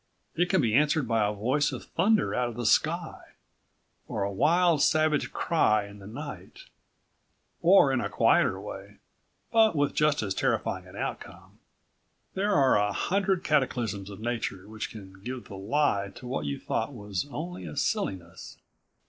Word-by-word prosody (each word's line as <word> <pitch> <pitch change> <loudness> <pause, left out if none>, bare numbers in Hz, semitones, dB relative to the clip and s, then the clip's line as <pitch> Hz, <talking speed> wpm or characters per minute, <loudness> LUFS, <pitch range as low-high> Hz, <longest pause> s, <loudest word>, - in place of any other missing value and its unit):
It 175 +2 +1
can 190 - +3
be 115 -5 +1
answered 145 +1 +3
by 115 -2 +2
a - - -1
voice 125 +8 0
of - - -6
thunder 215 +1 +1
out 125 -1 0
of 115 - -8
the 120 0 -4
sky, - - +1 0.9
or 100 - -2
a 100 - -2
wild, 165 - +3
savage 155 -1 +2
cry 110 -11 +2
in 100 0 -12
the 100 - -11
night, 145 - -9 1.0
or - - +6
in - - +1
a - - -2
quieter - - +3
way, - - -9 0.5
but 220 -5 +4
with 145 -1 +1
just 150 -4 +2
as 100 -2 -1
terrifying - - -1
an - - -13
outcome. - - -7 0.7
There 200 +1 0
are 135 -5 +4
a 105 0 +1
hundred 195 - 0
cataclysms 120 -9 0
of 100 - -9
nature 110 -5 -3
which 110 0 -5
can 95 -3 -12
give 125 +3 -6
the 100 - -10
lie 100 -1 0
to 125 - -11
what 125 - -3
you 70 - -3
thought 115 +5 -2
was 105 -1 -4
only 150 - -6
a 75 - -8
silliness. 85 -3 -3
120 Hz, 165 wpm, -28 LUFS, 100-150 Hz, 1.0 s, or